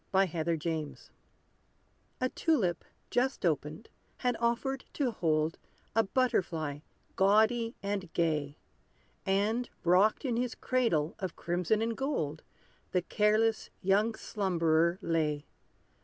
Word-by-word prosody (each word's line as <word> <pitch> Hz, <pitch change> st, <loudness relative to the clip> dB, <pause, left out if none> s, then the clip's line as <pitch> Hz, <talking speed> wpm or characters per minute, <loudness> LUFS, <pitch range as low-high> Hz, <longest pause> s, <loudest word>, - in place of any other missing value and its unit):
=The 190 Hz, -, +1 dB
Butterfly's 165 Hz, -1 st, -1 dB
Dream= 160 Hz, -1 st, -3 dB, 1.2 s
A 255 Hz, -, +1 dB
tulip, 215 Hz, -, +1 dB, 0.3 s
just 255 Hz, -4 st, +1 dB
opened, 155 Hz, +5 st, -1 dB, 0.3 s
had 250 Hz, -1 st, 0 dB
offered 240 Hz, +3 st, 0 dB
to 270 Hz, -5 st, 0 dB
hold 160 Hz, -5 st, 0 dB, 0.4 s
A 225 Hz, -, +6 dB
butterfly 180 Hz, -, 0 dB, 0.4 s
gaudy 220 Hz, +4 st, +3 dB
and 200 Hz, -3 st, -3 dB
gay; 150 Hz, -4 st, 0 dB, 0.7 s
And 210 Hz, +5 st, +1 dB
rocked 185 Hz, +9 st, +4 dB
in 240 Hz, -3 st, 0 dB
his 245 Hz, -1 st, -1 dB
cradle 225 Hz, -12 st, +1 dB
of 185 Hz, -4 st, -4 dB
crimson 180 Hz, +6 st, 0 dB
and 230 Hz, 0 st, -1 dB
gold, 160 Hz, -, -2 dB, 0.5 s
The 180 Hz, -2 st, +2 dB
careless 215 Hz, +3 st, +2 dB
young 205 Hz, +4 st, +3 dB
slumberer 170 Hz, -3 st, +1 dB
lay. 150 Hz, -3 st, 0 dB
195 Hz, 110 wpm, -31 LUFS, 165-230 Hz, 1.2 s, A